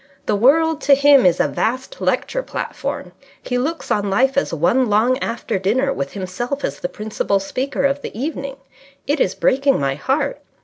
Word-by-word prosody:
The - - +1
world 310 +8 +3
to 280 - +5
him 280 -5 +6
is 175 -1 +2
a - - +3
vast 255 - -3
lecture - - 0
platform. - - -5 0.3
He 250 -1 -1
looks 320 +6 -3
on 205 -1 +1
life 260 +8 +2
as 275 - +1
one 220 - +2
long 235 +5 +3
after 230 -6 -3
dinner, 255 +9 +1
with 140 0 -4
himself 205 +9 -4
as 140 - -4
the 175 - -3
principal 210 -2 -1
speaker 260 +8 -3
of 280 +1 +1
the 220 - -7
evening. 275 -1 -4 0.5
It 290 +2 0
is 190 - +1
breaking 275 +1 +2
my 135 -1 0
heart. 275 - -1
255 Hz, 180 wpm, -20 LUFS, 200-280 Hz, 0.5 s, him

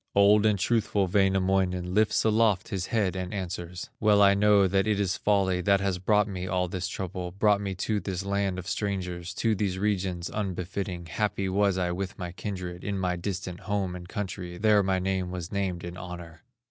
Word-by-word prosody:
Old 105 +2 +6
and 105 -2 +2
truthful 105 -1 +1
Wainamoinen 95 -1 +1
Lifts 110 +2 +3
aloft 110 -3 +2
his 95 -2 -3
head 100 -5 0
and 90 -1 -4
answers: 90 -2 -5
"Well 105 -1 +4
I 100 0 +7
know 100 0 +5
that 95 +2 +1
it 105 -2 +1
is 95 -3 +1
folly 95 -3 +1
That 100 +1 +3
has 95 -2 -1
brought 105 +2 +3
me 95 -2 -4
all 90 0 0
this 90 +1 -3
trouble, 90 -1 -4
Brought 100 +1 +2
me 100 -2 -3
to 105 +3 -1
this 95 0 -4
land 100 -1 0
of 95 - -6
strangers, 90 -4 -3
To 115 -1 +1
these 100 -3 -1
regions 95 -3 -1
unbefitting; 90 -2 -3
Happy 100 +2 -1
was 100 0 +2
I 90 -1 0
with 95 +2 -4
my 90 -2 -5
kindred, 90 -2 -6
In 100 -1 -2
my 90 -1 0
distant 90 0 -4
home 100 -3 -2
and 90 -1 -9
country, 90 -3 -5
There 105 +1 +4
my 95 -1 +1
name 95 -1 -1
was 90 -2 -5
named 95 -4 -2
in 85 0 -6
honor." 85 -2 -9
95 Hz, 195 wpm, -27 LUFS, 90-100 Hz, -, I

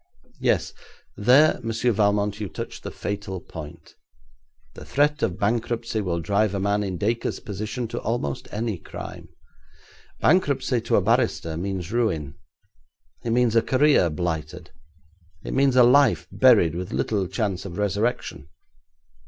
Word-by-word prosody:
Yes, - - +1 0.4
there, 130 +9 +5
Monsieur 115 +1 0
Valmont, 105 -1 +1
you 105 -3 -4
touch - - -7
the - - -6
fatal 100 -2 -5
point. 75 -3 -11 0.8
The - - -10
threat 145 - +1
of 95 -5 0
bankruptcy 115 +1 -1
will 85 -4 -2
drive 100 +4 +1
a - - -1
man 100 +1 +1
in 95 -3 -3
Dacre's 115 +6 -1
position 110 +4 -5
to - - -4
almost 110 - -3
any 110 -3 -3
crime. - - -9 0.9
Bankruptcy 140 -8 +2
to - - 0
a - - +4
barrister 80 -1 +1
means 90 0 -4
ruin. 85 - -1 0.9
It 120 - -3
means 120 -1 +2
a 115 - +6
career 135 - +3
blighted; 80 -1 -4 0.7
it - - -5
means 135 -1 +3
a 125 - +7
life 140 +3 +4
buried, 115 - +5
with 90 +2 -5
little 100 -4 -1
chance 95 -1 -2
of 90 -3 -8
resurrection. 105 - -2
105 Hz, 140 wpm, -24 LUFS, 90-120 Hz, 0.9 s, a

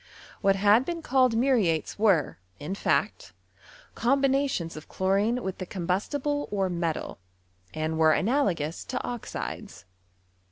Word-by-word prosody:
What 195 0 +3
had 205 +4 +4
been 335 +2 -5
called 255 -4 +3
mnriaies 225 - +1
were, 190 - +2 0.2
in 150 +6 -4
faot, 200 - -1 0.6
combinations 270 -8 +1
of 155 - -10
chlorine 200 +5 +1
mKk 190 -6 -4
the 185 - -4
combustible 255 - -2
or 195 -3 0
metal, 170 - -3 0.5
and 155 +3 -3
were 155 -1 +5
analagons 190 - 0
to 255 - -3
iMudes. 215 - -6
200 Hz, 120 wpm, -27 LUFS, 170-255 Hz, 0.6 s, were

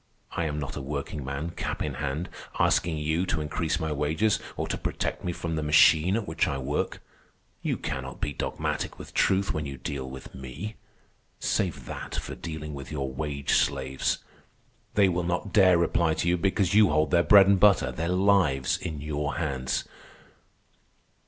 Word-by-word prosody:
I 85 - -1
am 75 -1 -2
not 70 - -5
a - - -4
workingman, 70 +2 -4
cap - - -3
in - - -2
hand, 75 +4 -3 0.3
asking 80 -2 +2
you 80 +4 0
to 80 - 0
increase 80 +2 -1
my 80 -2 -2
wages 80 +9 +1 0.2
or - - -2
to - - -1
protect - - -3
me 90 - -1
from 85 -1 -4
the 80 - -1
machine 80 +4 +5
at 115 -2 -2
which - - +1
I 70 - -1
work. 70 +2 -2 0.6
You - - -1
cannot 65 -1 -5
be 75 - -2
dogmatic - - -3
with - - -10
truth 95 0 +2
when 75 -1 -3
you 70 -1 -6
deal 65 -2 -5
with 65 0 -10
me. 70 - -7 0.7
Save - - -1
that - - -6
for - - -4
dealing 75 -2 -6
with 70 0 -8
your 70 -3 -3
wage 70 0 -3
slaves. 65 -1 +1 0.8
They 100 -2 +5
will 90 -1 0
not 90 +3 -2
dare 95 -4 +6
reply 85 -1 +2
to 85 - -1
you 90 - +4
because 95 +1 +1
you 105 -2 +6
hold 75 +1 +2
their 85 - +5
bread 100 +2 +8
and 100 -1 +4
butter, 100 0 +5
their 85 +2 -3
lives, 90 -8 +3
in 75 -3 -5
your 75 0 -2
hands. 65 -5 -1
80 Hz, 180 wpm, -27 LUFS, 70-90 Hz, 0.8 s, bread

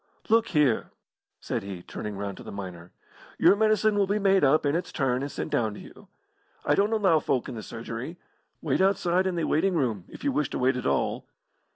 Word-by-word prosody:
"Look 225 +1 +4
here!" 150 -8 +2 0.5
said - - -3
he, 95 -3 -7
turning 105 -2 -6
round 100 -1 -4
to - - -10
the - - -8
miner, 90 -3 -8 0.5
"your - - +6
medicine 215 0 +3
will 200 -1 +2
be 205 +2 +1
made 195 -3 +3
up 145 +3 +4
in 145 +2 +2
its 175 - -2
turn 130 -1 0
and 140 +1 -4
sent - - -5
down 110 -3 0
to - - -9
you. - - -14 0.6
I - - +3
don't 205 +2 +2
allow 195 -8 +3
folk 130 -4 -1
in 130 - -6
the 110 - -6
surgery. 115 +9 -7 0.5
Wait 150 +2 +1
outside 190 -1 +2
in 185 - -1
the 170 - -1
waiting 180 +5 +1
room 115 - -1
if - - -12
you 285 - +1
wish 150 - 0
to - - -4
wait 130 +1 +2
at 125 - -2
all." 70 - -1
150 Hz, 220 wpm, -27 LUFS, 115-195 Hz, 0.6 s, your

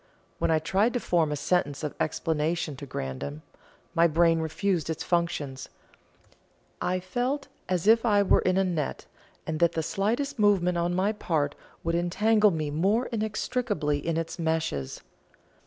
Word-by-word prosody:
When - - +1
I 160 - +4
tried 195 +9 +1
to 245 - 0
form 165 -8 +1
a - - 0
sentence 145 -2 0
of 150 - -2
explanation 155 0 -1
to 140 - -8
Grandon, 70 - -5 0.5
my 170 -1 +5
brain 165 +1 +3
refused 165 +1 -1
its 160 - -3
functions; 150 -6 -1 1.1
I 185 +1 0
felt 245 +10 -2 0.2
as 180 -1 0
if 225 +1 +5
I 205 -4 +4
were 195 - +4
in 185 0 +1
a 195 - +4
net, 170 -6 -2 0.4
and 160 -1 -3
that 170 0 +3
the 160 - -1
slightest 235 - -1
movement 180 -4 +3
on 175 +1 0
my 190 +3 +2
part 155 -8 -1 0.3
would 165 - -1
entangle 210 +5 +3
me 155 -5 -2
more 200 - +2
inextricably 215 - -1
in 165 +2 -2
its 165 +1 -4
meshes. 160 - -2
170 Hz, 155 wpm, -27 LUFS, 155-205 Hz, 1.1 s, my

